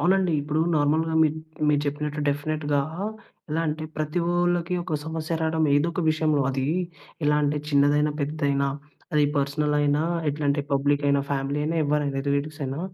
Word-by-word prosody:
అవునండి 185 -1 +3
ఇప్పుడు 150 +2 -1
నార్మల్‌గా 155 +2 +2
మి 155 - +5 0.4
మీరు 145 -1 +3
చెప్పినట్టు 150 +1 -2
డెఫినిట్‌గా 145 0 0 0.7
ఎలా 160 +2 0
అంటే 155 +1 -3
ప్రతి 155 +3 -1
ఓళ్ళకి 175 0 +1
ఒక 155 -4 -1
సమస్య 160 0 -3
రావడం 160 0 +1
ఏదో 145 +4 +3
ఒక 175 - -2
విషయంలో 155 -2 +1
అది 135 0 -1 0.6
ఎలా 150 0 +3
అంటే, 145 +1 +1
చిన్నదైనా, 145 +1 +3
పెద్దదైనా 140 -1 0 0.5
అది 150 -1 +4
పర్సనలయినా, 145 +1 +1 0.3
ఎట్లా 145 +1 -4
అంటే, 145 0 0
పబ్లికయినా, 140 0 +2
ఫ్యామిలీ 140 +1 -1
అయినా, 165 +2 -1
ఎవరైనా 145 -2 0
రిలేటివ్స్ 145 +2 -1
అయినా 135 +4 -3
150 Hz, 150 wpm, -25 LUFS, 145-155 Hz, 0.7 s, మి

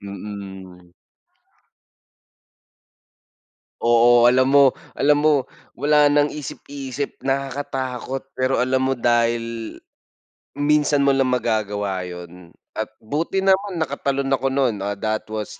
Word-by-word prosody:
Mm. 95 -3 -9 2.9
Oo, 120 +1 +5
alam 130 +1 +4
mo 140 -2 +5 0.2
alam 145 +1 +2
mo, 155 - +5 0.5
wala 145 0 +4
ng 145 0 +3
isip-isip, 140 -2 -6
nakakatakot 135 -1 -3
pero 130 +1 0
alam 130 +1 +1
mo 130 - +1
dahil, 115 -2 -1 0.8
minsan 145 0 +2
mo 140 - +4
lang 135 -1 +2
magagawa 105 -5 -1
yun 90 0 -11 0.2
at 110 - -4 0.2
buti 165 - -2
naman 195 0 +2
nakatalon 140 -3 -2
ako 135 0 +1
no'n. 130 -5 +1
Ah, 100 0 -2
that 110 +2 -3
was 110 -1 -5
130 Hz, 110 wpm, -21 LUFS, 110-140 Hz, 2.9 s, Oo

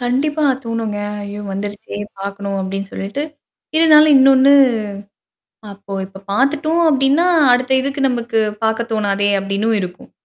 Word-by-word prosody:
கண்டிப்பா 290 +5 -1 0.2
தோணுங்க. 230 -2 -3 0.3
"ஐயோ 200 +1 -7
வந்துருச்சே! 205 +1 -6 0.2
பார்க்கணும்." 200 0 -5
அப்டின்னு 195 +1 -5
சொல்லிட்டு, 200 +9 -4 0.5
இருந்தாலும் 310 -2 +6
இன்னொன்னு 270 +1 +5 1.2
அப்போ 200 0 -12
இப்ப 195 0 -14
பாத்துட்டோம் 305 +7 +1
அப்டின்னா, 275 +4 +2 0.3
அடுத்த 250 +1 +1
இதுக்கு 275 +1 -3
நமக்கு 235 -2 -1 0.2
பாக்க 220 +1 0
தோணாதே 205 -1 0
அப்டின்னும் 200 +3 -1
இருக்கும். 180 -1 -8
230 Hz, 115 wpm, -17 LUFS, 200-275 Hz, 1.2 s, இருந்தாலும்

